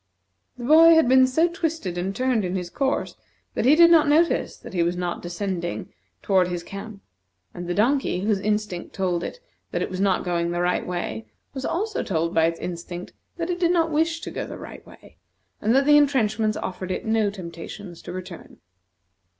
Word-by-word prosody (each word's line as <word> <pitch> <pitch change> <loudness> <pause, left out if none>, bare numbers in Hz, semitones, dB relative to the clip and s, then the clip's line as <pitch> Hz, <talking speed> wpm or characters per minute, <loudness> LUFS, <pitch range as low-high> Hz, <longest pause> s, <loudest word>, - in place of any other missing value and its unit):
The 245 - -8
boy 325 +5 +7
had 320 -5 +4
been 260 +1 +6
so 320 +7 +3
twisted 325 - -3
and 185 +3 -3
turned 255 -2 +1
in 180 0 -2
his 180 -2 -4
course 275 -1 -1 0.4
that - - -1
he 280 +4 +6
did 335 +1 +7
not 315 -3 +6
notice 320 +4 +2
that - - -11
he 175 - +1
was 170 +1 +1
not 175 -1 -3
descending 175 0 -4 0.3
toward 190 -3 +3
his 175 -1 -4
camp, 200 +2 -9 0.5
and 175 0 -7
the 175 - -2
donkey, 240 -3 +1
whose 205 0 +1
instinct 210 -3 -2
told 180 -3 -1
it - - -6 0.3
that - - -2
it - - -5
was 185 +1 -3
not 195 -2 +2
going 170 -1 -1
the 175 0 -2
right 180 0 0
way, 110 -12 -4 0.3
was 265 -1 -5
also 420 +5 -2
told 165 -3 -1
by 160 0 +4
its 165 0 -1
instinct 175 0 -6 0.2
that 340 +1 -2
it 355 - -3
did 345 -2 +2
not 330 -2 +2
wish 325 +2 0
to - - -6
go - - -4
the - - -8
right - - -10
way, - - -17 0.4
and 220 +4 +2
that 275 +1 +4
the 295 0 +7
intrenchments 220 -7 +2
offered 185 0 -5
it 185 - -3
no 220 -2 +2
temptations 175 -1 -9
to - - -8
return. 185 -1 -9
205 Hz, 200 wpm, -24 LUFS, 175-285 Hz, 0.5 s, boy